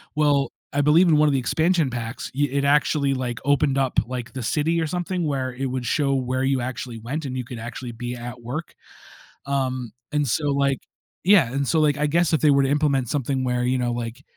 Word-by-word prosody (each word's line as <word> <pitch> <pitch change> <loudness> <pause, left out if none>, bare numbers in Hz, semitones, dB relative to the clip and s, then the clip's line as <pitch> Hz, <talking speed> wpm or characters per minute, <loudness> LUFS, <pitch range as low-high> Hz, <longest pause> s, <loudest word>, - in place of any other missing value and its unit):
Well, 145 -2 +2 0.2
I 145 - +2
believe 160 +5 +5
in 160 - +5
one 150 0 +5
of - - +1
the 135 - +2
expansion 160 +4 +1
packs, 120 -1 -5
yeah, 145 -1 +1
it 140 0 0
actually, 140 -1 +2
like, 125 -2 -3
opened 145 -1 +2
up, 135 -1 +2
like, 125 -1 -6
the 130 -2 -5
city 160 +7 +1
or - - 0
something 180 +1 -2
where 135 -3 -1
it 135 +2 -4
would 125 -1 -3
show 140 0 +1
where 130 0 -1
you 135 -1 +1
actually 120 -1 -5
went 140 +7 -4
and 130 -1 -4
you 125 - -3
could 125 - -8
actually 120 +1 -6
be 120 +1 -5
at 120 0 -8
work. 135 +8 -5 0.7
Um, 130 -4 -2 0.2
and 150 -1 +1
so, 145 +5 0
like 140 -1 +1 0.5
Yeah, 175 - +5
and 140 -1 -1
so, 160 - +2
like, 145 -2 +2
I 150 - +1
guess 170 +2 +2
if 160 - +2
they 150 - +5
were 140 -1 +4
to 135 - +1
implement 140 -4 +1
something 135 -2 -1
where, 125 -1 0
you 125 +1 +1
know, 120 -1 0
like, 120 +2 -5
135 Hz, 230 wpm, -23 LUFS, 125-150 Hz, 0.7 s, believe